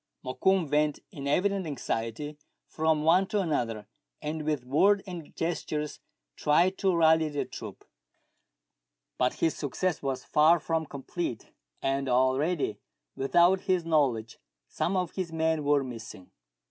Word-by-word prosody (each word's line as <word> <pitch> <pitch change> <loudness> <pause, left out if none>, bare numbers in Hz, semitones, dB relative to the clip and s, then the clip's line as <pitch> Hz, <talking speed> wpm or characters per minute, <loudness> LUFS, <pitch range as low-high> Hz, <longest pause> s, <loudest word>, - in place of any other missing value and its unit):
Mokoum 185 +6 +1
went 150 0 +2
in 140 -7 -6
evident 190 +4 +1
anxiety 140 +1 -3 0.3
from 160 -1 0
one 180 +4 +4
to 210 0 0
another, 120 - -1 0.3
and 155 +1 -4
with 150 -5 -1
word 195 +10 +3
and 175 -5 -8
gestures 150 -3 -3 0.4
tried 175 +6 +3
to 190 -3 +2
rally 160 -1 +4
the 145 -1 -2
troop; - - -9 1.3
but 125 0 +2
his 165 - +1
success 160 +5 -2
was 135 -2 -3
far 160 +3 +5
from 160 0 -1
complete, 140 -2 -5 0.3
and 135 0 0
already, 130 +2 +1 0.4
without 175 +7 +3
his 185 -4 0
knowledge, 130 -9 +1 0.3
some 190 +2 -1
of 180 -3 -1
his 185 -3 -4
men 160 -1 0
were 145 -1 +3
missing. 115 -7 -9
155 Hz, 135 wpm, -28 LUFS, 135-175 Hz, 1.3 s, far